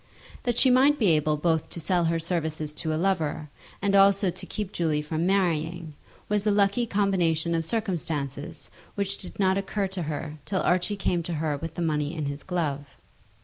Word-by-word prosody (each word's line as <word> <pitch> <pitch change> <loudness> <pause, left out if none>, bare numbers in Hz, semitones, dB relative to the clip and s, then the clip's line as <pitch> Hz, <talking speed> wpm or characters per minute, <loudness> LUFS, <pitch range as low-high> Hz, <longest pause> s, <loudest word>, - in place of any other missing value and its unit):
That 240 -1 0
she 260 - +6
might 275 +4 +5
be 215 -8 +3
able 155 -1 +2
both 160 0 0
to - - -7
sell 175 +2 +1
her 165 0 +1
services 160 -3 -2
to 160 +1 -3
a 155 - 0
lover, 160 -4 0 0.3
and 200 0 +2
also 195 -1 +5
to 185 - -8
keep 210 -3 -4
Julie 155 -5 0
from 160 +3 -1
marrying, 170 -4 0 0.3
was 210 -1 +1
a - - +5
lucky 205 +3 +2
combination 175 -6 +1
of 165 -1 +1
circumstances 165 - -3 0.2
which 200 0 -1
did - - -9
not 190 0 +3
occur 200 +1 -2
to 190 -1 -4
her 155 0 -4
till 190 -2 -1
Archie 185 +3 +1
came 180 -3 0
to 170 +1 -4
her 155 -1 -1
with 165 +3 -6
the 175 - -2
money 150 0 -1
in 155 -2 -3
his 140 +1 -4
glove. 150 -6 -3
170 Hz, 190 wpm, -26 LUFS, 155-195 Hz, 0.3 s, she